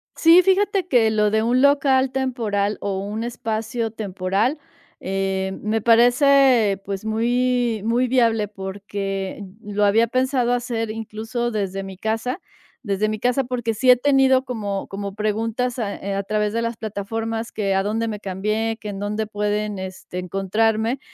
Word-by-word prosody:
Sí, 335 +2 +7
fíjate 390 -1 +2
que 235 -6 +4
lo 210 -1 +2
de 220 0 +2
un 245 +3 +2
local 270 -2 +3
temporal 225 -6 -1
o 195 -1 -2
un 210 +3 -4
espacio 225 0 -3
temporal, 205 +6 -1 0.4
eh, 190 0 -2
me 215 +1 0
parece, 245 -2 +4
pues, 195 +1 -5
muy 240 0 +1
muy 240 +2 +2
viable 230 -4 +2
porque 195 0 -5 0.2
lo 205 -1 0
había 225 +3 +4
pensado 255 0 +1
hacer 235 -2 -2
incluso 225 +2 -4
desde 195 -3 -3
mi 190 -1 -9
casa 225 - -2 0.4
desde 210 0 0
mi 215 - -3
casa, 250 +4 +1
porque 240 -3 -2
sí 255 +4 +5
he - - +8
tenido 265 0 +3
como 205 -6 -4
como 200 0 -5
preguntas 225 +4 -1
a, 210 -4 -2
eh, 200 0 -4
a 195 - -1
través 210 +1 0
de 230 +2 -1
las 230 0 -3
plataformas 225 +2 -4
que, 195 -2 -1
a 195 - +2
dónde 225 +3 -1
me 210 -2 -4
cambié, 215 +4 -2
que, 210 - -6
en 200 - -5
dónde 210 +1 -2
pueden, 210 0 -2
este, 185 -1 -7
encontrarme, 215 +6 0
220 Hz, 160 wpm, -22 LUFS, 205-245 Hz, 0.4 s, he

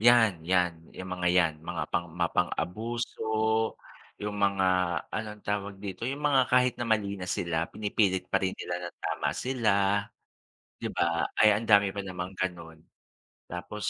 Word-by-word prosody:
'Yan, 110 -8 +5
'yan 90 -1 +3 0.2
yung 95 0 -7
mga 90 0 -2
'yan, 80 -3 +4
mga - - -3
pang 85 -1 -2
mapang-abuso, 90 +7 -2 1.0
yung 105 0 -3
mga 100 -1 +2 0.4
anong 105 -1 -5
tawag 100 -1 -2
dito, 100 +1 -5
yung 135 +4 -2
mga 135 -4 +3
kahit 125 -1 +4
na 120 - -2
mali 105 -3 +1
na 90 - -5
sila, 85 -2 0
pinipilit 100 -3 0
pa - - +2
rin 95 -1 0
nila 85 - -4
ng - - -16
tama - - -1
sila. 125 -5 +1 1.1
'Di - - -2
ba? 85 -1 +1
Ay 105 0 +6
ang 110 +2 0
dami 100 -2 +6
pa 100 - -6
namang 90 -1 -5
ganu'n. 85 -3 -4 0.7
Tapos 90 +4 -4
100 Hz, 155 wpm, -29 LUFS, 90-110 Hz, 1.1 s, Ay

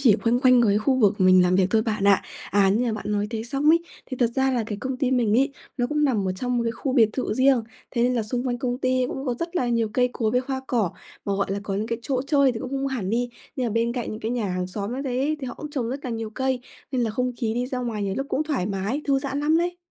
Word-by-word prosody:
chỉ 235 -7 +5
quanh 235 +1 +3
quanh 255 -2 +6
cái 205 -2 +3
khu 260 +5 +2
vực 210 -3 +3
mình 185 0 +6
làm 180 +1 +3
việc 190 - +4
thôi 220 -1 +3
bạn 215 -3 -1
ạ. 200 -1 +5 0.3
À, 200 -1 +4
như 225 +6 +2
mà 230 - 0
bạn 210 -1 -3
nói 205 0 0
thế 225 -2 -3
xong 275 +5 0
ấy, 335 +1 +5 0.3
thì 260 - -5
thật 240 - +5
ra 265 0 +3
là 240 -3 0
cái 210 -2 -4
công 260 -1 -3
ty 260 -1 0
mình 235 -4 +2
ấy, 275 +1 +2 0.2
nó 245 -2 +1
cũng 300 +3 +1
nằm 215 -9 +1
ở - - 0
trong 245 +6 -2
một 235 - +1
cái 230 - 0
khu 260 +3 -3
biệt 230 -5 +5
thự 250 -5 -2
riêng, 260 -2 +4 0.3
thế 235 - 0
nên 250 +1 +2
là 235 - +1
xung 245 +3 -3
quanh 245 -1 -1
công 245 0 -2
ty 255 -1 +1
cũng 270 +2 -5
có 245 - 0
rất 335 +6 -4
là 250 -5 +1
nhiều 230 -2 +1
cây 250 -1 +3
cối 220 -3 0
với 250 +2 +2
hoa 265 -1 -1
cỏ. 225 -9 +1 0.3
Mà, 200 - -1
gọi 195 - 0
là, 200 - -2
có 200 -1 -3
những 210 +2 -1
cái 230 0 -2
chỗ 255 0 -1
chơi 280 -2 +3
thì 225 - -5
cũng 260 - -5
không 275 0 -1
hẳn 230 -8 -2
đi, 245 +2 0 0.3
nhưng 255 - 0
mà - - -1
bên 230 +2 +1
cạnh 245 -2 -3
những 215 - -6
cái 225 +1 -2
nhà 235 -5 -1
hàng 180 0 -2
xóm 200 +5 -4
như 270 - -3
thế 270 +4 0
thì 265 - -4
họ 245 - -5
cũng 300 - -8
trồng 260 -6 -2
rất 275 +2 -5
là 250 - -3
nhiều 225 -1 -4
cây, 260 +2 -1 0.3
nên 250 - +1
là 225 - 0
không 250 +3 -1
khí 225 -3 -1
đi 245 +1 -1
ra 255 0 -3
ngoài 230 -4 -3
nhiều 195 -1 -1
lúc 270 - -2
cũng 290 - 0
thoải 280 - -1
mái, 200 +7 -2
thư 275 -1 +2
giãn 275 0 -3
lắm 310 +2 +3
lấy. 350 +1 0
245 Hz, 315 wpm, -24 LUFS, 215-265 Hz, 0.3 s, quanh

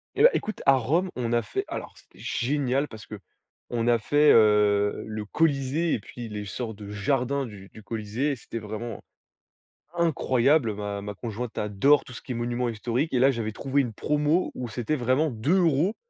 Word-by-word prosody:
Et - - +3
bah, - - +10
écoute! 215 - -3
A 135 - +7
Rome, 155 +9 +1
on 120 -2 -2
a 120 - +3
fait 105 - -3
alors, - - -6
c'était - - -21
génial 135 +2 0
parce 110 -2 -11
qu'on 115 +3 -7
a 120 -1 +4
fait, 145 +7 +4
heu, 105 -2 +4
le 110 -1 -5
Colisée 150 +4 +1
et - - 0
puis 115 +3 -9
les 105 -1 -5
sortes 110 +3 -5
de 100 -1 -9
jardins 135 +6 0
du 100 -4 -11
du 110 - -14
Colisée. 115 +6 -2
C'était 115 -1 -7
vraiment 110 +1 -6 0.9
incroyable! 140 -6 +2
Ma 100 -1 -4
ma 105 +1 -5
conjointe 115 +2 -6
adore 105 +8 +3
tout 125 - -11
ce - - -8
qui 130 - -5
est - - -5
monuments 120 +1 -1
historiques. 120 +7 -2
Et 125 - +3
là, 135 +2 +5
j'avais 115 -3 -3
trouvé 140 +5 0
une 120 -4 -4
promo, 150 - +1
où 125 -2 -5
c'était 120 +6 -2
vraiment 130 +4 +1
2€ 165 - +2
120 Hz, 185 wpm, -26 LUFS, 110-140 Hz, 0.9 s, bah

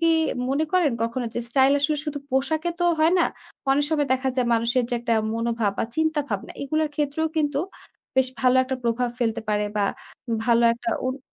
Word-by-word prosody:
কি 330 - +3 0.4
মনে 280 +4 +1
করেন 350 -8 +3
কখনো 235 +2 -2
যে - - -1
স্টাইল 265 +2 +4
আসলে 300 +1 +1
শুধু 295 -1 -3
পোশাকে 315 +6 0
তো - - +2
হয় 320 +3 +4
না। - - +4 0.5
অনেক 285 +2 +3
সময় 295 -3 +1
দেখা 260 0 0
যায় 245 -2 +1
মানুষের 235 +2 +1
যে - - +1
একটা 235 -1 +1 0.2
মনোভাব 230 -2 0
বা - - +1
চিন্তাভাবনা 295 -10 -1
এগুলার 310 +2 0
ক্ষেত্রেও 300 +2 0
কিন্তু 295 -2 +1 0.6
বেশ 265 -1 +4
ভালো 255 0 +4
একটা 260 +1 -3
প্রভাব 235 +1 +1
ফেলতে 225 -2 0
পারে 210 0 +1
বা 205 - +2 0.6
ভালো 235 0 +4
একটা 235 0 -3 0.2
অনু 260 +2 -2
265 Hz, 185 wpm, -24 LUFS, 235-300 Hz, 0.6 s, স্টাইল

